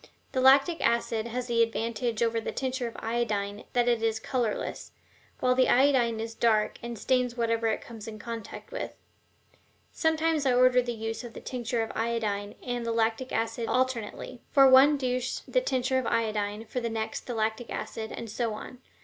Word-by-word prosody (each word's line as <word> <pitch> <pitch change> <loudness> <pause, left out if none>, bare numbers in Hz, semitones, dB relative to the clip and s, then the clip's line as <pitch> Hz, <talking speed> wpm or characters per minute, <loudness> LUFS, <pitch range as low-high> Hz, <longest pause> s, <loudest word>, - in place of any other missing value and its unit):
The 260 - 0
lactic 275 +6 +5
acid 230 -1 +1
has 245 +1 -3
the 235 -2 +2
advantage 230 0 0
over 230 0 +1
the - - -3
tincture 260 -2 -2
of 230 - -8
iodine 210 -3 -2
that 245 -1 +2
it 235 -2 +2
is 225 -1 0
colorless, 235 -2 -3 0.5
while 250 0 +4
the 255 0 +3
iodine 250 -4 +4
is 225 0 -4
dark 220 -2 +1
and 235 -1 -6
stains 250 +1 0
whatever 230 -1 +1
it 220 - 0
comes 225 -2 -10
in 220 -1 -7
contact 230 - -7
with. - - -5 1.0
Sometimes 320 -2 +1
I 250 - +3
order 250 0 +5
the 245 0 -3
use 225 +2 -4
of 235 -2 -9
the - - -6
tincture 240 -2 -2
of 225 - -5
iodine 215 -3 -2
and 245 -1 -3
the 230 - -1
lactic 230 +3 0
acid 225 0 -1
alternately: 255 -1 -2
for 275 -1 +6
one 270 +3 +7
douche 255 -1 -2
the - - +2
tincture 260 - +1
of 255 - -3
iodine, 215 -1 -1
for 240 +3 -3
the 235 -1 -2
next 220 -1 -4
the 245 - -3
lactic 220 +2 -1
acid, 220 -1 -5
and 230 - -6
so 225 0 -2
on. 250 +3 -9
235 Hz, 185 wpm, -28 LUFS, 225-255 Hz, 1.0 s, one